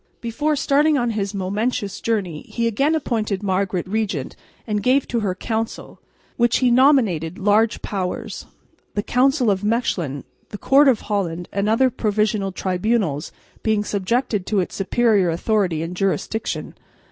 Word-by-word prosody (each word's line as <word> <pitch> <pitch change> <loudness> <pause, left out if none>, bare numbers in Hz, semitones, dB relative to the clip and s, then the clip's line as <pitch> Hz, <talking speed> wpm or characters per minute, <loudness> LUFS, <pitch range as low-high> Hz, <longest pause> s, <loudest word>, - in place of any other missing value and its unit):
Before 295 +7 -1
starting 295 +1 +3
on 240 -2 0
his 205 -2 -3
momentous 200 +2 -2
journey 190 -9 -1
he 235 - -1
again 275 +8 +2
appointed 220 -9 -2
Margaret 190 -2 -1
regent, 195 -9 -2 0.3
and 210 -2 -1
gave 255 +5 +2
to 235 - 0
her 195 -4 -1
Council, 225 +3 -4 0.4
which 240 0 +3
he 250 -2 +3
nominated, 230 - +3
large 210 +3 +2
powers; 185 -3 -4 0.5
the 205 - 0
Council 255 -1 +2
of 190 0 -1
Mechlin, 190 - -1 0.3
the 205 - -7
Court 280 +6 +4
of 250 -5 +3
Holland 175 -5 -2
and 200 +1 0
other 255 +4 +3
provincial 210 -2 0
tribunals 185 -4 -1 0.3
being 215 -2 +1
subjected 210 0 -1
to 210 - +1
its 180 - -2
superior 205 -2 +2
authority 175 -2 0
and 170 +2 -5
jurisdiction. 195 +3 -2
210 Hz, 145 wpm, -21 LUFS, 190-235 Hz, 0.5 s, Court